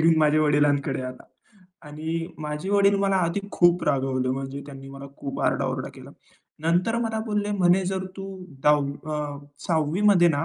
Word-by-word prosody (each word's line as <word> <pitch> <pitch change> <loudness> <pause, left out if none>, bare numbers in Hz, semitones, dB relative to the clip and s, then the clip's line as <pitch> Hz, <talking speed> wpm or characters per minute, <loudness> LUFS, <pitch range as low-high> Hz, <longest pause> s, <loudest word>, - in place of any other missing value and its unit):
घेऊन 165 0 +5
माझ्या 155 0 +4
वडिलांकडे 145 -2 +2
आला. 130 0 -7 0.6
आणि 160 +2 -3 0.2
माझे 150 +6 -4
वडील 200 0 +4
मला 195 -1 +2
आधी 170 +4 -1
खूप 175 0 +4
रागवले. 130 -2 0
म्हणजे 135 +1 -4
त्यांनी 135 -1 -10
मला 135 0 -9
खूप 140 - -5
आरडाओरडा - - 0
केला. - - -12 0.5
नंतर 180 +8 +2
मला 225 -1 -1
बोलले 210 -1 -1
म्हणे 185 -2 +3
जर 190 0 -2
तू 195 - -6 0.4
,10वी 145 -2 +4 0.2
अ, 150 -1 -3 0.3
6वी 160 +1 +1
मध्ये 175 -4 +6
ना 145 0 0
155 Hz, 160 wpm, -25 LUFS, 140-190 Hz, 0.6 s, मध्ये